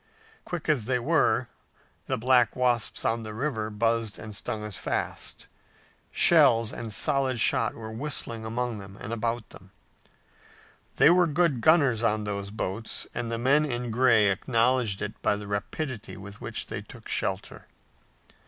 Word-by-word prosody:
Quick 175 -3 -5
as 145 -8 +2
they 125 +1 +1
were, 120 - +2 0.6
the - - 0
black 125 -1 +3
wasps 125 -2 0
on 115 +1 +1
the 110 -1 -7
river 110 -4 -2
buzzed 115 0 0
and 110 -1 -8
stung 105 +1 -4
as 105 -2 -5
fast. - - -4 0.6
Shells 115 -1 +5
and 115 -2 -6
solid 130 +4 +1
shot 115 -1 +2
were 110 -1 -8
whistling 115 -2 -3
among 115 0 -3
them 100 0 -11
and 110 - -5
about 115 0 -2
them. 95 0 -14 1.3
They 155 - +6
were 175 0 +4
good 155 -5 +1
gunners 140 -5 +4
on 110 -2 +1
those 100 -1 -4
boats 105 +1 -3
and 120 -1 -3
the 115 - -1
men 135 +6 +3
in 120 -4 -3
gray 115 -4 +4
acknowledged 115 0 +1
it 105 +1 -6
by - - +2
the 105 0 -7
rapidity 105 +5 -4
with 100 +1 -11
which - - -3
they - - -5
took - - -13
to - - -7
shelter. - - -3
115 Hz, 160 wpm, -27 LUFS, 105-125 Hz, 1.3 s, They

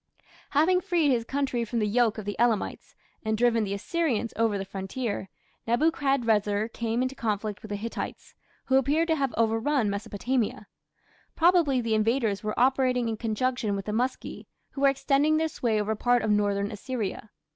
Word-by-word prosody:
Having 360 +4 +4
freed 335 -5 +2
his 240 -3 +1
country 265 -1 -1
from 230 +1 -4
the 215 - +2
yoke 225 +1 +2
of 215 - -6
the 205 -1 -3
Elamites, 235 -3 0 0.3
and 220 0 0
driven 230 -1 +3
the 200 -1 -2
Assyrians 245 - -1
over 225 -2 +1
the 195 - -4
frontier, 195 +2 -4 0.4
Nebuchadrezzar 230 -6 +1
came 230 +1 -1
into 255 +1 -2
conflict 210 -5 -3
with 215 - -10
the 205 - -2
Hittites, 225 +3 -6 0.3
who 265 - +3
appear 290 +5 +2
to 325 -1 +1
have 275 -4 0
overrun 225 +1 +1
Mesopotamia. 210 +3 -2 0.7
Probably 330 -7 +4
the 230 -1 -1
invaders 220 -1 +1
were 215 +1 -2
operating 255 -2 +2
in 225 - -2
conjunction 230 0 -1
with 195 - -4
the 210 - -3
Muski, 250 +4 -3 0.2
who 275 - -6
were 280 - +6
extending 275 +3 +2
their 320 0 +1
sway 230 -8 -1
over 210 +1 0
part 245 +2 +2
of 215 - +1
northern 205 -1 +1
Assyria. 215 -2 -4
230 Hz, 170 wpm, -27 LUFS, 210-270 Hz, 0.7 s, were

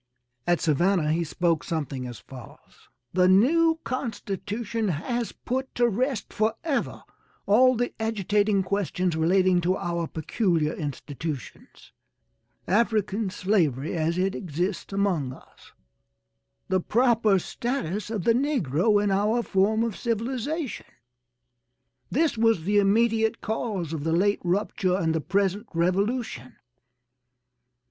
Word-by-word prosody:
At 175 -1 +3
Savannah 165 +1 +2
he 170 +2 +1
spoke 165 0 0
something 140 -6 -3
as 120 -2 -8
follows: 125 0 -14 0.2
"The 180 0 +4
new 320 - +4
constitution 225 -2 -3
has 225 - -2
put 260 +1 -4
to 240 0 +3
rest 245 +2 -2
forever 225 +7 -1 0.4
all 255 +5 +5
the 245 +1 -1
agitating 210 -2 +1
questions 185 -3 -1
relating 180 +2 +3
to 185 +2 +1
our 170 -1 -2
peculiar 160 -1 0
institutions 145 -1 -7 0.8
African 210 0 +1
slavery 170 - 0
as 165 +1 0
it 190 +1 +1
exists 180 +3 -3
among 185 -10 0
us - - -18 1.0
the 190 - +2
proper 225 -2 +3
status 215 - -3
of 215 -5 -3
the 230 - +4
negro 210 - +2
in 205 - +1
our 210 +5 +1
form 210 +3 +2
of 230 -4 -2
civilization. 255 +5 -3 1.2
This 300 -4 +1
was 225 -7 +3
the 205 +3 +3
immediate 220 +2 +2
cause 205 -7 -3
of 155 -3 -4
the 160 +1 0
late 200 +4 +2
rupture 185 0 0
and 165 -4 0
the 160 - -1
present 200 +4 0
revolution. 185 - -1
200 Hz, 120 wpm, -26 LUFS, 170-225 Hz, 1.2 s, all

